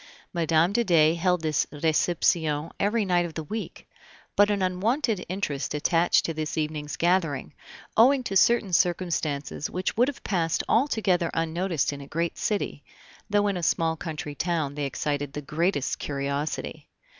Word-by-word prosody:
Mme. 165 0 +2
de 235 +3 +2
Dey 160 -6 +4
held 180 0 +1
this 155 -1 +1
reception 160 0 +1
every 210 +2 +1
night 175 -2 +2
of 160 - -12
the 160 - -3
week, 215 +8 -6 0.5
but 205 0 +5
an 200 -2 0
unwonted 210 +4 0
interest 150 -7 -2
attached 165 +3 +2
to 165 - -2
this 155 0 -4
evening's 150 -1 -3
gathering, 165 - 0 0.4
owing 255 +4 +5
to 195 - -4
certain 210 -1 +4
circumstances 165 -6 0
which 185 +1 -2
would 245 +3 +4
have 285 - -5
passed 165 -4 0
altogether 210 - +2
unnoticed 165 -2 0
in 140 - -7
a 140 - -10
great 170 +3 -2
city, 205 -8 -2 0.5
though 205 0 +2
in 200 -2 0
a - - -3
small 165 -1 +1
country 155 -2 -5
town 160 -2 -1
they 145 0 -3
excited 145 0 -2
the 150 - -4
greatest 155 0 -1
curiosity. 140 +1 -3
170 Hz, 155 wpm, -26 LUFS, 150-190 Hz, 0.5 s, but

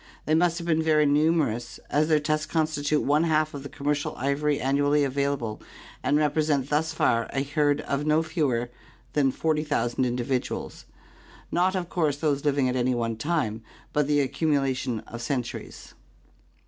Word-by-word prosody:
They 155 - +1
must 170 +1 +3
have 170 - -5
been 160 -2 +2
very 155 -1 +3
numer 150 -2 +3
ous, 120 0 -9
as 150 +1 +2
their 155 -1 +4
tusks 155 +1 -1
constitute 155 -2 +1
one 150 +3 +3
half 155 -1 +1
of 140 - -6
the 140 - -8
commercial 145 0 -2
ivory 140 +2 0
annually 145 +2 +2
available 140 -5 -1 0.4
and 145 - +2
represent 150 -2 +1
thus 160 +2 +1
far 115 -7 +1
a 135 - 0
herd 145 0 +1
of 140 +1 -2
no 155 +1 +2
fewer 135 -8 -1 0.4
than 140 -2 +3
40,000 150 -5 0
individuals— 125 +1 -2 0.7
not 185 +2 +2
of 180 -2 -2
course 155 -5 0
those 145 -2 0
living 140 -2 +2
at 125 - -1
any 125 0 +1
one 115 -1 -1
time, 115 -5 -1 0.3
but 150 -1 +2
the 145 -1 +3
accumulation 135 -5 0
of 120 +1 -9
centuries. 125 -2 -5
145 Hz, 160 wpm, -26 LUFS, 135-155 Hz, 0.7 s, their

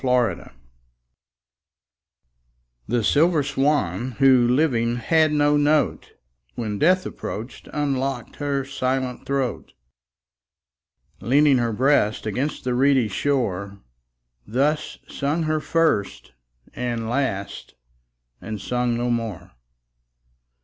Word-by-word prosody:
6 - - -6
Autoplay 125 -2 +1 2.4
The 120 -1 0
silver 155 - +3
swan, 130 - 0
who 130 -1 +4
living 120 -3 +1
had 155 +6 +2
no 145 0 +3
note, 145 +1 +1 0.4
When 105 -3 -4
death 185 +3 +3
approach'd, 115 +5 -7
unlock'd 135 -4 -2
her 140 -2 -2
silent 130 -2 -3
throat; 135 -3 -2 1.5
Leaning 140 +1 +3
her 120 -1 0
breast 110 -3 +1
against 125 +8 -2
the 125 - -1
reedy 130 -2 +3
shore, 100 -5 -2 0.7
Thus 145 +6 0
sung 150 +4 -2
her 155 0 0
first 120 - 0 0.4
and 120 -2 -3
last, 100 - -3 0.7
and 110 0 -6
sung 125 +3 -1
no 120 0 -1
more. 105 -6 -4
130 Hz, 100 wpm, -23 LUFS, 115-145 Hz, 2.4 s, who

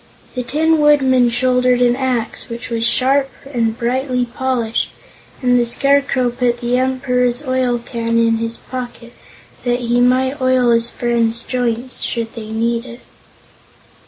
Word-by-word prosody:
The 250 - -2
Tin 310 +5 +1
Woodman 265 -4 +4
shouldered 250 +1 +2
an 245 -1 +3
axe 255 -3 -3
which 235 +1 -7
was 230 -1 -1
sharp 270 +3 +2 0.2
and 230 -2 0
brightly 250 +1 -1
polished, 240 -2 -2 0.5
and 245 0 +3
the - - +3
Scarecrow 275 0 +2
put 245 -1 -1
the 240 0 -1
Emperor's 250 0 0
oil 255 -2 0
can 230 -1 -3
in 230 0 +3
his 230 0 0
pocket, 245 -2 -8 0.5
that 245 0 0
he 240 0 +1
might 260 +3 +1
oil 255 -2 +3
his 230 0 +2
friend's 235 -1 -1
joints 245 0 -3
should 230 -2 -3
they 220 -2 -8
need 230 +2 -1
it. 235 +1 -11
245 Hz, 145 wpm, -17 LUFS, 235-255 Hz, 0.5 s, Woodman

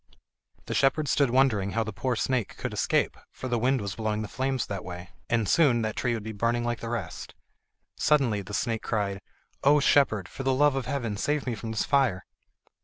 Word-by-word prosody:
The - - -4
shepherd 145 +2 +2
stood 140 -1 +3
wondering 115 -7 +2
how 115 - +1
the 110 -1 -6
poor 125 +4 -1
snake 125 -2 -1
could - - -4
escape, - - +1 0.2
for 130 - -6
the 120 -2 0
wind 130 +3 +2
was 100 -1 -3
blowing 110 0 -2
the - - -5
flames 130 +2 -1
that 100 -2 -5
way, 90 0 -8 0.2
and 115 -3 +1
soon 125 - +4
that 110 -1 -2
tree 120 -2 0
would 110 - -5
be 110 - -5
burning 115 +3 0
like 120 0 -2
the 115 - -5
rest. 110 -9 -5 0.6
Suddenly 130 -9 +2
the 100 +1 -6
snake 115 -2 -1
cried: 100 -3 -2 0.4
"O 145 +2 +6
shepherd! 120 -9 +3
for - - -8
the 135 0 +1
love 145 0 +4
of 135 -2 -3
heaven 120 -7 -2
save 145 +7 0
me 125 - -1
from 115 +1 -6
this 110 - 0
fire!" 130 -10 +2
115 Hz, 210 wpm, -27 LUFS, 105-135 Hz, 0.6 s, O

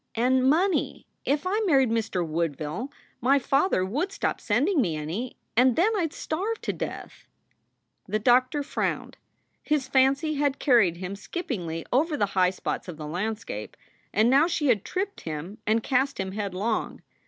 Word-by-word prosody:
And 255 +3 +3
money 355 +6 +1 0.2
if 290 +4 0
I 395 +4 +1
married 270 -7 +4
Mr. 215 -6 0
Woodville, 160 - -3 0.3
my 270 +4 +4
father 275 - +2
would 295 - -2
stop 395 - -2
sending 280 - +2
me 170 -9 0
any, 165 +12 -4 0.2
and 250 +1 +5
then 435 +6 +3
I 355 -5 +1
d 295 - -14
starve 405 +8 -2
to - - -2
death - - -7 0.4
" - - -48
The 210 +2 0
doctor 255 +6 +3
frowned. 280 - -3 0.4
His 300 -4 0
fancy 270 +4 +3
had 285 -1 0
carried 225 - +4
him 185 +2 -5
skip 345 - -6
pingly 165 - -3
over 300 +4 +2
the 205 - +2
high 185 -1 +4
spots 185 - -4
of 175 -4 -7
the 155 - -6
landscape, 185 - -4 0.3
and 215 +2 +3
now 275 +6 +5
she 310 -5 0
had 215 -5 +3
tripped 390 +2 -3
him 160 +6 -6
and 220 +1 +2
cast 270 0 +1
him 190 0 -2
headlong. 205 +2 -2
250 Hz, 170 wpm, -26 LUFS, 190-290 Hz, 0.4 s, and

